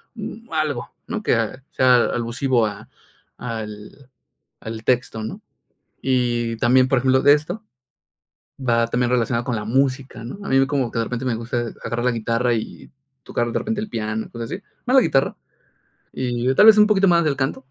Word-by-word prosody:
mm, 225 +1 -8
algo 150 -6 -1 0.2
¿no?, 230 -2 -3
que - - +2
ah, 115 +4 -2
sea 130 -1 +4
alusivo 120 0 0
a 105 -1 -6 0.5
al 110 +2 -7 0.5
al 110 0 -7
texto, 120 -3 0
¿no? 110 - -6 0.6
Y 120 -3 0
también, 130 +3 +4
por 135 -1 +2
ejemplo 130 +1 +3
de 145 - +7
esto, 175 +9 -2 1.0
va 115 -3 +1
también 125 +1 0
relacionado 115 -1 0
con 125 -3 -1
la 105 - -3
música, 130 +1 -1
¿no? 130 +11 -7
A - - -4
mí 135 0 +4
como 135 -5 -1
que 115 - -2
de 115 - 0
repente 125 +2 -4
me 125 -3 0
gusta 120 +1 -3 0.2
agarrar 120 0 -2
la 125 - +3
guitarra 115 +1 0
y 110 - -5 0.3
tocar 120 0 -2
de - - -1
repente 220 -1 -3
el 215 - -4
piano, 110 - -3
cosas 115 -1 -6
así. 200 - -5 0.2
Más 255 - +2
la - - +8
guitarra 135 - +1 0.8
y 125 0 -1
tal 210 - +6
vez, 220 - +9
un 210 - +7
poquito 195 -2 +3
más 170 -1 +4
del 145 -3 +1
canto, 135 0 -2
125 Hz, 185 wpm, -22 LUFS, 115-135 Hz, 1.0 s, vez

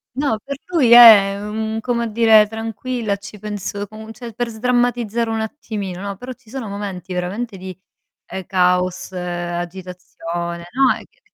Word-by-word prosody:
No, 275 -5 0
per 280 0 -5
lui 305 -10 +2
è 210 -5 +9
un 220 +1 -3
come 235 -1 -1
dire: 220 -1 +6
"Tranquilla, 225 0 -3
ci 200 +1 -11
penso" 205 -1 -5
comu 220 +2 -10
cioè 235 +1 -9
per 240 +2 -2
sdrammatizzare 235 -1 0
un 225 0 -1
attimino, 210 -6 -5
no, 200 -1 -5
però 250 +4 -7
ci 250 -3 -21
sono 260 -4 -5
momenti 195 -3 -6
veramente 195 +5 -3
di, 185 0 -8 0.5
ehm, 190 -2 -7
caos, 180 0 +1
agitazione, 175 -1 -5
no, 265 0 +4
è - - -10
che - - -30
215 Hz, 155 wpm, -20 LUFS, 185-235 Hz, 0.5 s, è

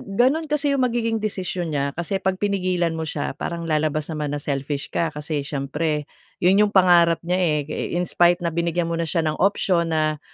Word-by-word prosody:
gano'n 280 +8 +2
kasi 295 -1 +1
'yong 275 -2 +1
magiging 230 -2 0
desisyon 185 -5 -3
niya 140 0 0
kasi 175 +3 -2
'pag 190 0 +1
pinigilan 185 -4 0
mo 160 - -3
siya 150 -3 -3
parang 170 +3 -4
lalabas 155 -1 0
naman 150 -2 -3
na - - -3
selfish 140 0 -3
ka. 165 -1 0
Kasi 150 -1 -3
siyempre 150 +2 -2 0.4
'yon 190 +3 +5
'yong 210 -1 +4
pangarap 175 -3 +5
niya, 180 +2 0
eh, 160 -5 +2
eh, - - -3
in 175 - +1
spite 175 0 +3
na 170 - 0
binigyan 170 +1 -1
mo 170 - -2
na 165 - -1
siya 165 0 +1
ng 155 -1 -1
option 180 -4 +2
na 155 -1 0
170 Hz, 205 wpm, -22 LUFS, 155-185 Hz, 0.4 s, yon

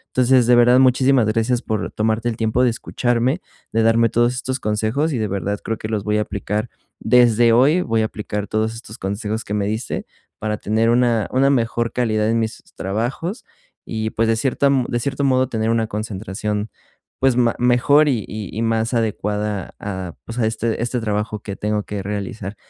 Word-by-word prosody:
Entonces, 130 -1 +4
de 125 - +6
verdad, 120 +1 +6
muchísimas 130 -2 +4
gracias 115 +3 +1
por 110 -2 -2
tomarte 110 +2 0
el 115 - -4
tiempo 115 +2 +1
de 125 - +4
escucharme, 120 +5 -1 0.3
de 115 - +2
darme 115 +1 +4
todos 120 +3 +2
estos 130 +1 -3
consejos 110 +8 0
y - - -1
de 110 - 0
verdad 100 +1 -2
creo 115 - -2
que 110 - -6
los 110 -3 -2
voy 105 0 +1
a - - +2
aplicar 105 0 -3 0.4
desde 120 -1 +5
hoy, 140 +9 +4
voy 115 -7 0
a - - +1
aplicar 105 -1 -4
todos 110 +1 -1
estos 115 0 -10
consejos 105 +3 -3
que 105 - -4
me 100 -1 0
diste 110 +4 -3 0.3
para 105 0 -2
tener 110 +2 +1
una 120 -3 +2
una 135 +2 +3
mejor 115 -2 0
calidad 110 -3 +1
en 115 0 +2
mis 110 -1 -3
trabajos 120 - -3 0.4
y, 110 0 -3
pues, 115 +1 0
de 115 - +3
cierta 135 +3 +1 0.2
de 120 - -1
cierto 140 +3 -2
modo 130 -1 +2
tener 110 -2 -1
una 115 -1 +1
concentración, 105 0 -4 0.5
pues 130 -2 +3
ma 120 -2 +2
mejor 125 +5 +4
y 120 -8 +1
y 110 +1 -5
más 115 +1 0
adecuada 105 -3 -2
a, 95 -4 -5
pues, 115 +2 -7
a 115 - +2
este 110 0 -2
este 120 +1 -1
trabajo 105 0 -2
que 100 -2 -6
tengo 105 0 -1
que 100 -1 -5
realizar. 100 0 -5
115 Hz, 190 wpm, -20 LUFS, 105-125 Hz, 0.5 s, de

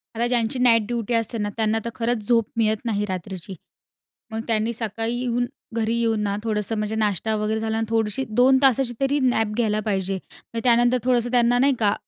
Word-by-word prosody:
आता 235 +2 0
ज्यांची 240 0 0
night 235 -2 +5
duty 240 -1 -2
असते 230 0 0
ना, 205 -1 -2
त्यांना 220 0 +1
तर - - -1
खरंच 230 -3 -1
झोप 230 -2 +3
मिळत 220 -1 +3
नाही 210 -2 0
रात्रीची. 185 0 -6 0.8
मग 220 - -3
त्यांनी 225 0 0
सकाळी 225 +1 -3
येऊन, 245 -1 0 0.3
घरी 225 0 0
येऊन 225 -2 +1
ना, 200 -1 -1
थोडंसं 215 0 -1
म्हणजे 215 +1 -2
नाश्ता 215 0 0
वगैरे 215 +1 -1
झाला, 220 0 -2
आणि 225 0 -1
थोडीशी 225 +2 0
2 250 +4 +4
तासाची 265 -2 +4
तरी 275 +2 +1
नॅप 225 -5 +1
घ्यायला 215 -3 +1
पाहिजे. 195 -1 -1 0.4
मग 230 - -1
त्यानंतर 240 +1 +4
थोडंसं 245 -1 +1
त्यांना 245 0 +4
नाही 275 +1 +3
का, 210 -2 +2
225 Hz, 195 wpm, -23 LUFS, 215-240 Hz, 0.8 s, night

